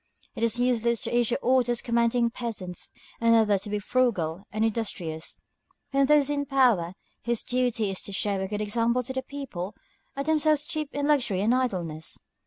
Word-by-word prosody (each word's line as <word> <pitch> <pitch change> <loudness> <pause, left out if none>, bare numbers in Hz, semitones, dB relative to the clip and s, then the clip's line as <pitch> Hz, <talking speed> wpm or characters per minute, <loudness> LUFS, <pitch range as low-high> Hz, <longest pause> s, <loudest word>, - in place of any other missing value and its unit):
"It - - -7
is 230 0 +1
useless 235 -2 +1
to - - -2
issue 240 0 +2
orders 245 -2 +2
commanding 235 0 +1
peasants 215 -7 -5 0.3
and 230 0 +4
others 210 -4 +3
to 210 - -7
be 210 - -1
frugal 200 -6 0
and 215 +1 +1
industrious, 190 -8 -3 0.5
when 275 0 +3
those 295 -1 +5
in 285 -1 -1
power, 235 -11 +3 0.3
whose 235 -1 0
duty 245 -4 0
it - - -1
is 190 - -2
to - - -5
show 195 0 -1
a 190 - -2
good 210 +1 -3
example 230 +4 +1
to 260 +2 -5
the 260 - -1
people, 260 -9 -6 0.4
are 275 - -1
themselves 310 -1 +3
steeped 305 -3 -4
in 285 0 0
luxury 245 -10 +2
and 220 +4 +3
idleness." 175 -11 -1
235 Hz, 185 wpm, -27 LUFS, 205-260 Hz, 0.5 s, those